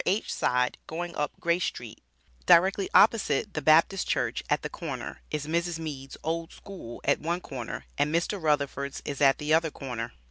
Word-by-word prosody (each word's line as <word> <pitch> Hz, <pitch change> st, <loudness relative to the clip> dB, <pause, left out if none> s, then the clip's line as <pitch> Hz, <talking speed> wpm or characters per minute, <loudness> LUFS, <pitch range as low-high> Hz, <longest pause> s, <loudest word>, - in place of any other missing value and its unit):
H. 200 Hz, +4 st, 0 dB
side 125 Hz, 0 st, +1 dB
going 170 Hz, +1 st, -5 dB
up 150 Hz, -, -3 dB
Grace 170 Hz, +1 st, +1 dB
street, 120 Hz, -3 st, -6 dB, 0.5 s
directly 190 Hz, +3 st, +5 dB
opposite 215 Hz, -2 st, +4 dB
the 155 Hz, -, -2 dB
Baptist 160 Hz, +6 st, +4 dB
church -, -, 0 dB
at -, -, +1 dB
the -, -, -1 dB
corner, -, -, -6 dB
is 150 Hz, -1 st, -3 dB
Mrs. 170 Hz, +2 st, -1 dB
Meads 145 Hz, -4 st, -6 dB
Old 165 Hz, +1 st, -2 dB
School 180 Hz, -, -10 dB
at -, -, +2 dB
one 170 Hz, +3 st, -1 dB
corner, 125 Hz, -8 st, -6 dB
and 145 Hz, +1 st, +2 dB
Mr. 175 Hz, +4 st, 0 dB
Rutherfords 140 Hz, -2 st, -1 dB
is 140 Hz, -1 st, -4 dB
at 135 Hz, -1 st, +5 dB
the 150 Hz, +1 st, 0 dB
other 160 Hz, 0 st, +3 dB
corner. 125 Hz, -5 st, -6 dB
155 Hz, 175 wpm, -28 LUFS, 140-170 Hz, 0.5 s, directly